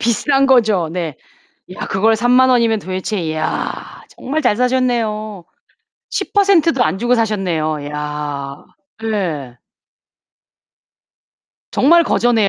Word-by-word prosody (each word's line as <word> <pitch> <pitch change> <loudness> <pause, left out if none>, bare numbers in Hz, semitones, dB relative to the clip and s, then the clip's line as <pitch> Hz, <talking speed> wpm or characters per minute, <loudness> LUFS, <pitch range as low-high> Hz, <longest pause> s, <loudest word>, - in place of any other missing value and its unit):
비싼 270 +4 +2
거죠. 215 -10 +3
네. 170 -5 -4 0.6
야, - - -5
그걸 220 +3 +2
30,000 250 +3 +4
원이면 230 -3 +2
도대체 185 -2 -3
야, 155 - -4
정말 305 +4 -3
잘 210 - +2
사셨네요. 230 -6 -1 0.7
10% 390 -6 +2
도 245 - +2
안 190 - -1
주고 240 +4 +1
사셨네요. 180 -9 -1
이야. 145 -1 -5 0.5
네. 165 - -3 2.2
정말 335 +5 +4
거저네요. 225 -5 +2
215 Hz, 185 characters per minute, -17 LUFS, 170-250 Hz, 2.2 s, 30,000